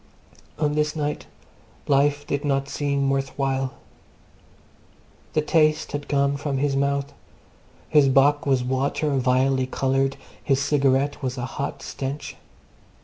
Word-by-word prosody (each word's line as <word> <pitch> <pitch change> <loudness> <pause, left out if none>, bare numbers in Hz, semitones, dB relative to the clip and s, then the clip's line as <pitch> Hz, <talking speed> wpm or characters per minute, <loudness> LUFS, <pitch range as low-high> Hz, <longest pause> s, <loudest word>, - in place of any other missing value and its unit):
On 150 -1 0
this 150 0 0
night 150 -1 -3 0.6
life 145 +1 +2
did 140 0 -2
not 140 -1 0
seem 140 0 -1
worth 135 0 -2
while. 135 -1 -1 1.6
The 155 - +1
taste 155 0 +2
had 145 0 -4
gone 140 0 +1
from 140 -1 -2
his 140 0 0
mouth; 140 +1 0 0.7
his 145 -3 +4
bock 145 +2 +3
was 130 -2 +2
water 135 +4 0
vilely 130 +1 +2
coloured; 135 +1 0 0.3
his 135 -1 +2
cigarette 140 0 +1
was 130 -1 -3
a 120 - -3
hot 140 +1 -5
stench. 140 +2 -5
140 Hz, 130 wpm, -24 LUFS, 135-145 Hz, 1.6 s, his